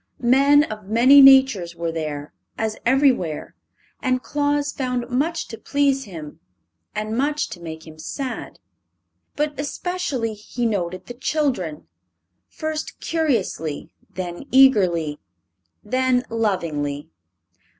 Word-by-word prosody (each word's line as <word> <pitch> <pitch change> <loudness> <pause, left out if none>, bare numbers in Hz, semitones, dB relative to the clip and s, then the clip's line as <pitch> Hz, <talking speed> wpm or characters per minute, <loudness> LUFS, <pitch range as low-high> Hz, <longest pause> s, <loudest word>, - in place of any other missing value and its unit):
Men 285 +2 +6
of 210 -7 -7
many 255 +6 +7
natures 265 -11 +6
were 170 -1 -2
there, 150 -2 -5 0.2
as 220 -1 -1
everywhere, 255 - +2 0.5
and 255 -1 0
Claus 290 0 0
found 250 -2 -3
much 310 +6 -1
to 225 - -8
please 280 -1 +1
him 160 -7 -9 0.6
and 215 +1 -2
much 290 +4 0
to 175 - -8
make 160 -2 -8
him 155 -1 -13
sad. 255 - -5 0.8
But 295 0 -2
especially 290 -6 -2
he 215 +3 -5
noted 185 -4 -2
the 245 - -8
children 245 - -2 0.6
first 310 0 -5
curiously, 230 - -2 0.2
then 175 +3 -6
eagerly, 185 - +4 0.6
then 255 0 +1
lovingly. 160 -10 -2
240 Hz, 110 wpm, -22 LUFS, 175-275 Hz, 0.8 s, many